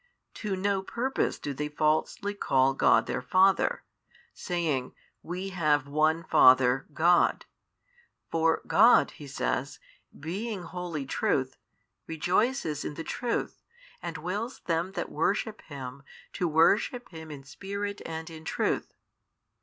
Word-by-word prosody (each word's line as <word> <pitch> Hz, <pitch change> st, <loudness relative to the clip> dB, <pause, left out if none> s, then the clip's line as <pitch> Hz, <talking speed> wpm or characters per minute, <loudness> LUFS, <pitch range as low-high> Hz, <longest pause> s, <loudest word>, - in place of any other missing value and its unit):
To 210 Hz, -4 st, -3 dB
no 195 Hz, +1 st, 0 dB
purpose 245 Hz, +7 st, -1 dB
do 145 Hz, -, -5 dB
they 150 Hz, +2 st, -3 dB
falsely 155 Hz, +7 st, 0 dB
call 135 Hz, -9 st, +2 dB
God -, -, +4 dB
their 125 Hz, -, -3 dB
Father, 185 Hz, +9 st, +3 dB, 0.5 s
saying, 155 Hz, -8 st, -2 dB, 0.3 s
We 180 Hz, +3 st, -5 dB
have 150 Hz, -6 st, +1 dB
One 155 Hz, +3 st, +2 dB
Father, 130 Hz, -1 st, +5 dB
God. 170 Hz, +4 st, +3 dB, 0.9 s
For 165 Hz, 0 st, +2 dB
God 230 Hz, +4 st, +5 dB
(He 145 Hz, -, -11 dB
says) -, -, -2 dB, 0.4 s
being 195 Hz, +5 st, -4 dB
wholly 175 Hz, -4 st, -5 dB
Truth, 130 Hz, 0 st, 0 dB, 0.5 s
rejoices 175 Hz, -, 0 dB
in 150 Hz, -, -5 dB
the 165 Hz, -, -5 dB
truth 240 Hz, +6 st, -3 dB, 0.4 s
and 170 Hz, -2 st, -5 dB
wills 205 Hz, -, -4 dB
them 170 Hz, +2 st, -1 dB
that -, -, -4 dB
worship 205 Hz, +7 st, -1 dB
Him, 135 Hz, -2 st, -8 dB, 0.3 s
to 180 Hz, -, -1 dB
worship 200 Hz, -, +2 dB
Him 160 Hz, -2 st, -10 dB
in 145 Hz, -2 st, -9 dB
Spirit 200 Hz, +8 st, -5 dB
and 160 Hz, 0 st, -6 dB
in 160 Hz, -1 st, -10 dB
truth. -, -, -2 dB
165 Hz, 125 wpm, -28 LUFS, 145-195 Hz, 0.9 s, Father